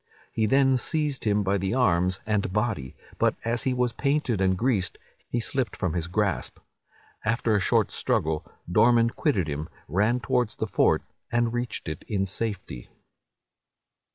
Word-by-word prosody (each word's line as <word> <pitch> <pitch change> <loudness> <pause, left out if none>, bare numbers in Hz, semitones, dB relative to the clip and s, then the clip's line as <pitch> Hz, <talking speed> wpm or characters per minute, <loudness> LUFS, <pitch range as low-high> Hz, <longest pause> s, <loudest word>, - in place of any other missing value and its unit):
He 110 -1 +1
then 135 +1 +4
seized 150 -1 -1
him 105 -1 +2
by 100 +1 +1
the 95 +4 -1
arms 90 -6 +2
and 105 -4 0
body, 100 - -1 0.2
but, - - +3
as 115 +1 -1
he 130 - +2
was 125 -1 +1
painted 140 -7 0
and 95 -1 +2
greased, 110 -5 0 0.3
he 120 - 0
slipped 125 +1 -1
from 90 -5 -1
his 85 -1 -1
grasp. 95 0 -1 0.7
After 115 0 +1
a - - +3
short 95 - +2
struggle, 75 -1 0 0.3
Dorman 115 +4 +5
quitted 105 - 0
him, 75 +1 -4 0.2
ran 105 - +2
towards 120 -1 0
the - - -2
fort, 110 - +2 0.3
and 120 0 +1
reached 120 -5 -3
it 80 +3 -5
in 100 -3 0
safety. 95 - -4
110 Hz, 155 wpm, -26 LUFS, 95-120 Hz, 0.7 s, Dorman